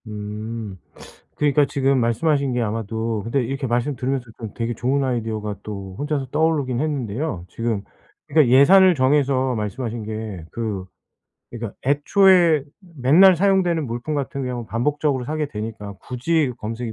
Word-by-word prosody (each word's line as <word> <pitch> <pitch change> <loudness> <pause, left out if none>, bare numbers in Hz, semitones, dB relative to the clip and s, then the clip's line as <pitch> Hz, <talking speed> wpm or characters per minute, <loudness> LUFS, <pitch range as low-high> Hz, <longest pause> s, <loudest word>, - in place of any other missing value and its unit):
음 105 -1 -6 0.6
그러니까 145 0 +3
지금 135 -1 +1
말씀하신 140 +3 +1
게 120 - 0
아마도 110 0 -2
근데 125 +4 0
이렇게 135 +3 -3
말씀 120 +4 0
들으면서 130 0 -2
좀 110 -4 -7
되게 115 0 -2
좋은 130 +5 0
아이디어가 110 -5 -2
또 100 -3 -7
혼자서 145 -2 -2
떠오르긴 150 -6 +1
했는데요. 135 - -3
지금 115 -3 -2 0.4
그니까 150 -2 +4
예산을 180 +9 +6
정해서 130 -2 +2
말씀하신 110 +2 -4
게 110 -5 -6
그 105 -5 -4 0.7
그니까 115 -3 -6
애초에 165 +1 +4 0.3
맨날 165 +9 +6
사용되는 180 -4 +2
물품 120 +6 -4
같은 140 -1 -3
경우 125 -2 -4
반복적으로 140 +3 -1
사게 155 +3 -2
되니까 105 -4 -6
굳이 135 +2 0
검색이 115 +2 -5
125 Hz, 350 characters per minute, -22 LUFS, 110-145 Hz, 0.7 s, 예산을